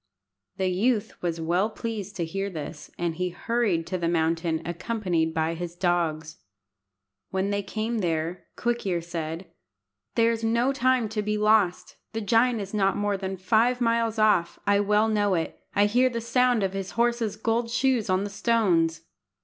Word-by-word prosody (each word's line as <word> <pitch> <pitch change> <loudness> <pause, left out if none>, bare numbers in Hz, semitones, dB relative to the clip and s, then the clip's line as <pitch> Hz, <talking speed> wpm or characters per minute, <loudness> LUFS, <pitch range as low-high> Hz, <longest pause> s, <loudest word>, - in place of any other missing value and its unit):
The 190 - 0
youth 220 +4 0
was 170 -2 -2
well 175 +6 +1
pleased 215 -2 -5
to 175 -3 -2
hear 195 +4 -3
this, 155 -3 -7
and 170 -2 -2
he 180 0 -1
hurried 205 -4 0
to 185 +2 -3
the 170 - 0
mountain 165 -1 0
accompanied 175 -2 -1
by 160 0 0
his 170 0 -6
dogs. 165 -3 -1 0.9
When 190 +1 -1
they 200 0 0
came 220 +3 -3
there, 165 -1 -2
Quick 240 0 -1
ear 175 -2 +1
said 165 +1 -5 0.6
"There 230 0 +4
is 230 0 -3
no 235 +4 +2
time 255 -3 +2
to 215 0 -2
be 210 0 -1
lost. 210 -4 +2 0.2
The 225 - -2
giant 230 +3 +3
is 195 +1 -7
not 195 -2 +2
more 205 0 0
than 190 0 -4
five 230 +6 +2
miles 230 -2 +1
off. 205 -6 +3
I 200 0 +3
well 210 +2 +3
know 205 -3 +2
it. 165 -1 -3 0.2
I 205 - +5
hear 245 +5 +3
the 235 -2 -3
sound 240 -1 +2
of 190 0 -1
his 195 -1 -5
horse's 235 -3 +1
gold 230 +2 0
shoes 245 -3 +1
on 185 +1 +2
the 205 - -5
stones." 185 -7 +2
200 Hz, 175 wpm, -26 LUFS, 175-225 Hz, 0.9 s, I